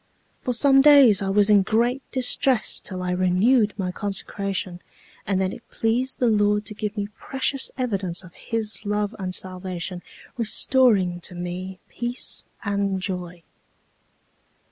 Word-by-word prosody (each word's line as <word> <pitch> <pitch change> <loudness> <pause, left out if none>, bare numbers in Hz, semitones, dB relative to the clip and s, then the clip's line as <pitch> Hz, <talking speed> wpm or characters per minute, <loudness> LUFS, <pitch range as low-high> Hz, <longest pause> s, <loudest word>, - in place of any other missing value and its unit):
For 250 - -2
some 270 +2 +5
days 275 -8 +7
I 195 - -1
was 205 +1 +3
in 205 -1 +6
great 235 +6 +1
distress 255 -2 +1
till 185 -2 -6
I 180 - -2
renewed 195 +5 +2
my 185 -3 -2
consecration, 195 -2 -4 0.5
and 195 -2 +1
then 190 -1 -1
it 235 - -13
pleased 245 +4 -1
the 250 - +1
Lord 210 -2 +2
to 210 - -5
give 210 +1 -4
me 205 0 -2
precious 270 0 -1
evidence 195 -8 -1
of 180 -1 -14
His 225 -1 -4
love 210 0 -2
and 185 -1 -2
salvation, 185 -1 -3 0.4
restoring 215 -5 +2
to 180 - -5
me 180 +2 -5
peace 240 +1 -3 0.2
and 200 -2 -1
joy. 180 -2 -5
205 Hz, 145 wpm, -23 LUFS, 185-235 Hz, 0.5 s, days